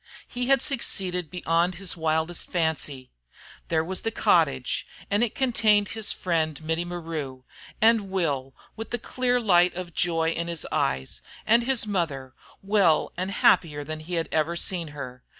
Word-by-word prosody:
He 245 0 -3
had 270 -1 +4
succeeded 185 - -1
beyond 175 +1 0
his 190 0 -1
wildest 160 +1 0
fancy. 155 -6 -2 0.6
There 160 -1 +1
was 185 +2 -3
the 225 - -1
cottage, 145 - +1 0.2
and 205 +3 +3
it 235 - -2
contained 220 -6 +3
his 220 -2 -1
friend 160 -4 -1
Mittie 160 +2 -1
maru, 160 -7 -5 0.4
and 220 -3 +4
Will, 145 -8 -1 0.2
with 225 0 -7
the 240 - -1
clear 250 +1 0
light 180 -6 +4
of 175 -1 -6
joy 165 -1 +1
in 170 0 -3
his 170 -2 -3
eyes, 65 0 -1 0.2
and 230 +2 +5
his 260 -3 +2
mother, 155 -10 -2 0.3
well, 195 -5 +3
and 185 +2 -2
happier 150 -6 +3
than 155 +1 -6
he 170 +3 -5
had 165 -1 -1
ever 160 +2 +1
seen 170 -1 0
her. 130 -4 -8
175 Hz, 160 wpm, -26 LUFS, 155-205 Hz, 0.6 s, and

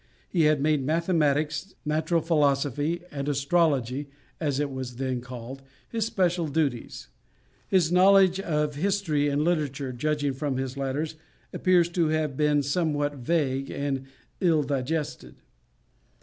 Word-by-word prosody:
He 165 -4 +2
had 150 -1 +3
made 150 -2 +2
mathematics, 155 +1 0
natural 160 +2 +1
philosophy, 150 +1 +1
and 140 0 -3
astrology 140 -2 +1 0.3
(as 145 -4 -1
it 145 -1 -1
was 130 -2 -5
then 130 -1 -2
called) 125 +1 -8 0.3
his 225 -2 -1
special 180 -6 +1
studies. 145 -5 -2 0.6
His 175 -4 +2
knowledge 190 0 +5
of 150 -5 -1
history 155 -3 0
and 145 +1 +1
literature, 150 -5 -1
judging 145 +2 -1
from 135 -1 -2
his 130 0 -3
letters, 140 +4 -3 0.4
appears 180 -2 +3
to 170 -2 +1
have 155 -3 0
been 150 0 +2
somewhat 145 -1 0
vague 135 -1 0
and 135 -2 -3 0.3
ill 165 -5 +3
digested. 140 - -3
150 Hz, 130 wpm, -26 LUFS, 140-165 Hz, 0.6 s, knowledge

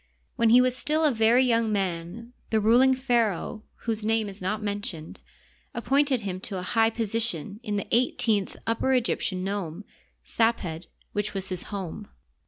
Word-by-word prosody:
When 230 - +3
he 245 +2 +7
was 255 0 +1
still 310 +4 +1
a 300 - +4
very 230 +2 +4
young 230 -2 +2
man 195 +4 -3 0.2
the 220 - +2
ruling 245 +5 +5
pharaoh, 235 -5 0 0.2
whose 225 -2 -1
name 220 0 +1
is 195 0 -8
not 210 +4 -2
mentioned, 205 -6 -5 0.5
appointed 270 +1 +1
him 185 -3 -4
to 190 0 -6
a 180 - -4
high 225 +3 +2
position 220 -4 -1
in 210 -4 -3
the 200 - -2
eighteenth 225 -4 +2
Upper 230 +4 +1
Egyptian 215 -6 0
nome 195 -1 -4 0.4
{Saped)^ 180 -8 -1 0.2
which 205 0 -3
was 195 -1 -4
his 185 -2 -4
home. 200 0 -6
220 Hz, 160 wpm, -26 LUFS, 195-235 Hz, 0.5 s, he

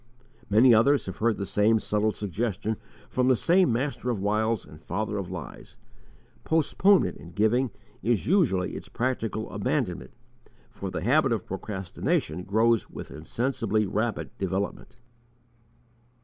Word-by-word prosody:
Many 115 +4 +6
others 140 +6 +4
have 95 - -6
heard 115 0 +1
the 100 - -3
same 105 +3 +3
subtle 105 +1 +1
suggestion 105 +1 -2 0.3
from 125 0 0
the 130 - +5
same 175 +3 +3
master 125 +1 -2
of 115 -5 -1
wiles 110 +2 0
and 75 +1 -14
father 105 +5 -3
of 95 -2 -5
lies. 90 -2 -8 0.7
Postponement 175 +5 +3
in 85 - -12
giving 120 +5 +2 0.3
is 115 0 +1
usually 130 - +2
its - - -8
practical 115 -3 -2
abandonment, - - -2 0.6
for 100 - -6
the 90 - -4
habit 135 +4 +3
of 110 -5 -1
procrastination 95 -3 -2
grows 110 +3 +2
with - - -9
insensibly 110 - -1
rapid 110 +4 -2
development. 95 +1 -3
110 Hz, 135 wpm, -27 LUFS, 100-125 Hz, 0.7 s, Many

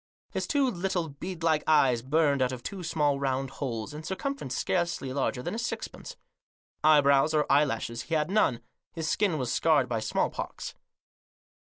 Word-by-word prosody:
His - - -2
two 280 -2 +2
little 180 -6 -1
bead 170 +4 -7
like 155 -2 +2
eyes 135 -6 +4
burned 140 +1 +2
out 130 0 +2
of 125 -2 -7
two 195 +5 -5
small 150 -4 +1
round 135 -1 -1
holes, 120 -1 -3
in 150 - -6
circumference 190 - -4
scarcely 170 -7 -1
larger 130 -2 -1
than - - -3
a 225 - -3
sixpence. 235 - -5 0.7
Eyebrows 145 0 +5
or 150 - +3
eyelashes 115 -5 +1
he 160 +8 -2
had 155 +3 0
none. 145 - +2 0.3
His 160 -2 -3
skin 185 -1 +1
was 125 -4 -2
scarred 150 -6 +3
by 115 -2 -1
smallpox. 110 0 -2
150 Hz, 165 wpm, -28 LUFS, 130-170 Hz, 0.7 s, Eyebrows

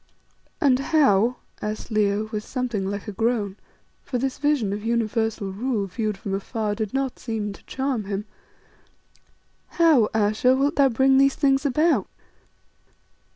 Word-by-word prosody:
"And 260 -3 +3
how," 260 -6 +3 0.3
asked 215 +2 -5
Leo, 210 0 +1
with 215 -2 -3
something 235 -8 -3
like 200 +2 -5
a - - -3
groan 215 -2 -1 0.4
for 255 - -3
this 265 +1 -2
vision 285 -9 +1
of 205 +1 -5
universal 225 -3 -1
rule 215 +1 -1
viewed 210 +1 -3
from 195 0 -5
afar 210 +2 -2
did 215 -1 -3
not 270 -1 -2
seem 215 -3 -3
to - - -16
charm 265 -5 -2
him 200 +1 -3 1.5
"how, 310 -10 +5
Ayesha, 220 +4 +2
wilt 280 +4 0
thou 275 -1 +5
bring 265 +3 +4
these 275 0 +4
things 275 -1 +2
about?" 310 +5 +2
225 Hz, 145 wpm, -24 LUFS, 210-270 Hz, 1.5 s, how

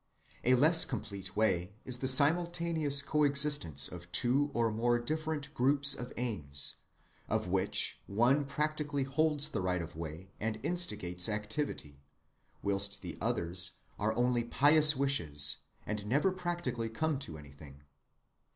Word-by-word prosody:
A 125 +1 +4
less 160 +6 +7
complete 100 -5 -5
way 100 -3 0
is 125 -1 -2
the 130 - -2
simultaneous 160 0 +2
coexistence 140 - +2
of 90 0 -11
two 135 +8 +2
or 115 -3 0
more 120 +2 +1
different 155 +3 -4
groups 140 +1 +2
of 125 0 -6
aims, 85 - -1 0.5
of - - -1
which - - 0
one 120 +8 +2
practically 150 0 -2
holds 150 +2 +1
the 110 -10 -3
right 90 0 -1
of 85 -1 -8
way 85 +3 -8
and 110 0 -3
instigates 105 - -1
activity, 105 - -5 0.6
whilst 100 0 0
the - - -7
others 85 +1 0 0.3
are 110 +2 -1
only 120 -1 +1
pious 150 +5 +5
wishes, 75 - +3 0.3
and 105 -1 -5
never 145 - +1
practically 175 -10 -4
come 155 +5 -2
to 80 - -7
anything. 70 -1 -14
120 Hz, 135 wpm, -31 LUFS, 95-145 Hz, 0.6 s, less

